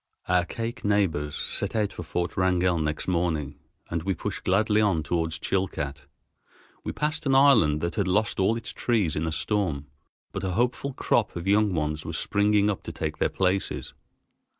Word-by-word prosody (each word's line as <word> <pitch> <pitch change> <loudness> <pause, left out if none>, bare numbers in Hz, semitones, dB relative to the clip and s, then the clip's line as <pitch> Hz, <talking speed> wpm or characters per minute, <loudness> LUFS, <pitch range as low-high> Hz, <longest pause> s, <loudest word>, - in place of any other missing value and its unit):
Our 90 -1 +3
Kake 115 +5 -5
neighbors 90 -8 +1
set - - -2
out 105 -2 0
for - - -6
Fort 85 +1 -3
Wrangell 90 -2 +2
next 75 -1 -2
morning, 85 -6 -1 0.3
and 85 -1 -1
we 95 +2 -1
pushed 100 -2 -5
gladly 105 +3 +3
on 95 -7 +2
toward 80 +1 0
Chilcat. 80 -4 -2 0.8
We - - -3
passed 150 0 -2
an 135 - +3
island 115 - +5
that 85 0 -1
had 100 -2 0
lost 100 +3 +1
all 105 +4 +3
its 115 - -6
trees 105 - +1
in 80 +2 -1
a - - -1
storm, 80 -6 -1 0.5
but 95 - -5
a 95 -1 -1
hopeful 125 +5 0
crop 110 -4 +1
of 85 0 -5
young 100 -1 +3
ones 75 0 -1
was - - -3
springing 105 0 +2
up 105 -2 -1
to - - -4
take 80 -1 -4
their - - +2
places. 95 0 -1
95 Hz, 180 wpm, -26 LUFS, 80-105 Hz, 0.8 s, island